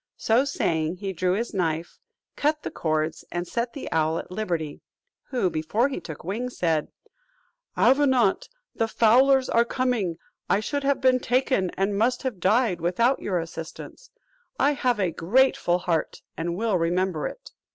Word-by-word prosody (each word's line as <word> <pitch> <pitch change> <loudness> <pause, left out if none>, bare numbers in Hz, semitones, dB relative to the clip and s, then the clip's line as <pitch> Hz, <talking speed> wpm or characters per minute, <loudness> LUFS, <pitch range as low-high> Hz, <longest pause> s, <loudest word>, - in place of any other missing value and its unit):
So 235 +5 +2
saying, 170 - -1
he 195 +1 -5
drew 180 +1 0
his 230 +5 -2
knife, 165 -3 -2 0.4
cut 300 +1 0
the - - -4
cords, 155 0 -1
and 175 0 -3
set 235 +3 -2
the 280 - -7
owl 160 0 +1
at - - -7
liberty; 170 -7 -3 0.4
who, 245 -8 0
before 180 - 0
he 270 - -4
took 160 -3 -9
wing, 225 +8 -3
said, 165 -9 0 0.9
"Avenant, 260 -6 +3 0.2
the 225 - 0
fowlers 255 +4 +4
are 235 - +3
coming, 235 -9 -1 0.3
I 200 - +3
should 285 +6 -3
have 275 -1 +1
been 255 -1 +4
taken, 250 -6 +1
and 195 +1 0
must 230 +5 +1
have 250 -8 -3
died, 195 -1 +2
without 230 +10 +2
your 185 -3 -1
assistance: 165 - -7 0.5
I 285 - +3
have 250 -5 0
a 185 -4 +1
grateful 180 0 +2
heart, 170 -3 -2
and 170 +1 -3
will 215 -4 +1
remember 175 -1 0
it." - - -10
200 Hz, 160 wpm, -25 LUFS, 170-255 Hz, 0.9 s, fowlers